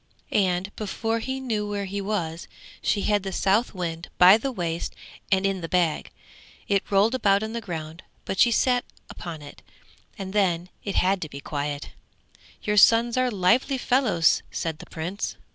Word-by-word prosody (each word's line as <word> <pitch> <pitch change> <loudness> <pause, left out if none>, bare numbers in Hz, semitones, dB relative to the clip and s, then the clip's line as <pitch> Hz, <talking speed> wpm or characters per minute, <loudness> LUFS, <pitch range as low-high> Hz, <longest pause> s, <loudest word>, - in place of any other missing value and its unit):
And 190 0 +1
before 225 +2 -2
he 260 +3 -3
knew 220 -5 -2
where 200 -1 -2
he 200 +1 -4
was 180 -5 -3 0.3
she 200 - 0
had 205 -1 +2
the 195 0 -5
Southwind 185 -5 0
by 180 +2 +9
the 265 +5 -2
waist 170 -7 -3 0.4
and 190 0 +3
in 195 -1 0
the 165 - -5
bag; 175 -4 +1 0.6
it 200 -1 0
rolled 205 +4 +3
about 205 -5 +3
on 220 +1 -4
the 235 - -3
ground, 165 -4 -6 0.2
but 190 - -3
she 245 - +6
sat 245 +2 +2
down - - -30
upon 165 -3 -7
it 145 - -12 0.6
and 190 -2 -6
then 180 -4 +1
it 200 - -4
had 190 +1 +2
to 155 - -4
be 140 - -8
quiet. 145 0 -4 0.7
'Your 210 0 0
sons 230 +3 +6
are 255 0 +2
lively 235 +7 +2
fellows!' 245 - +3
said 160 -2 -4
the - - -11
Prince. 175 +6 -4
195 Hz, 175 wpm, -25 LUFS, 175-220 Hz, 0.7 s, by